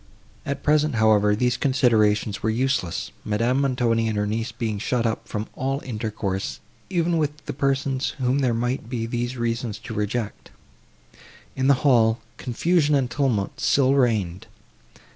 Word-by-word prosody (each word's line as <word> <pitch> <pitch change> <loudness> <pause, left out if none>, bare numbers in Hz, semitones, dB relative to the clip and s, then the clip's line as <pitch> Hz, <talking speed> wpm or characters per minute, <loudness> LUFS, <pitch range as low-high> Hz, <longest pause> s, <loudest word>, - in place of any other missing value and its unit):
At 140 -1 -3
present, 150 -2 +2
however, 105 -1 +4
these 125 +2 +1
considerations 110 -6 +2
were 110 - 0
useless, 120 -6 -1
Madame 115 +6 +1
Montoni 120 -4 +1
and 110 -1 -1
her 105 - +1
niece 110 +2 -2
being 110 -3 -3
shut 120 +2 0
up 115 - -2
from 105 0 -3
all 135 +1 -2
intercourse, 105 -5 -3 0.3
even 170 -2 +1
with 150 0 -2
the - - -4
persons, 135 0 -1
whom 130 +1 +1
there 125 -4 +1
might 120 0 -2
be 120 -3 -2
these 120 +2 -3
reasons 115 -2 -2
to 115 +1 -8
reject. 105 +1 -3 1.1
In 130 0 0
the 140 - +6
hall, 115 -4 +4 0.2
confusion 150 +4 +1
and 130 -4 0
tumult 120 -6 -1
still 135 -1 +3
reigned. 110 -9 +1
120 Hz, 150 wpm, -24 LUFS, 110-135 Hz, 1.1 s, the